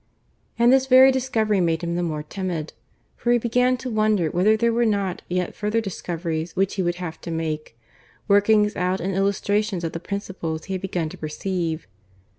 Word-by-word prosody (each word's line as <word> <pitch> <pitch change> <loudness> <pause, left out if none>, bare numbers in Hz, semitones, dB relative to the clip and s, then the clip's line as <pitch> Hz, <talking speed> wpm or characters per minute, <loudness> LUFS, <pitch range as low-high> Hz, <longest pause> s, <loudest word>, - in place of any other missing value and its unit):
And 240 +2 +5
this 265 0 +3
very 260 +1 +8
discovery 225 -6 +1
made 165 0 0
him 170 0 -2
the 175 - 0
more 155 -3 -2
timid. 170 -2 -4 0.4
For 240 - 0
he 240 - +5
began 250 +2 +2
to 250 +1 -6
wonder 215 -7 +2
whether 210 +5 +3
there 235 +1 +2
were 240 +1 +2
not 200 -5 0
yet 180 0 -1
further 210 +2 -1
discoveries 170 -5 -4
which 195 0 +1
he 195 - -1
would 175 -1 0
have 175 -2 -7
to - - -7
make 155 -6 -4 0.5
workings 210 +1 +4
out 180 +1 0
and 190 +3 -2
illustrations 200 0 0
of 165 - -2
the 165 - -5
principles 180 -4 -4
he 195 - -5
had 185 - -3
begun 175 -4 -2
to - - -11
perceive. 165 +1 -3
190 Hz, 190 wpm, -23 LUFS, 170-215 Hz, 0.5 s, very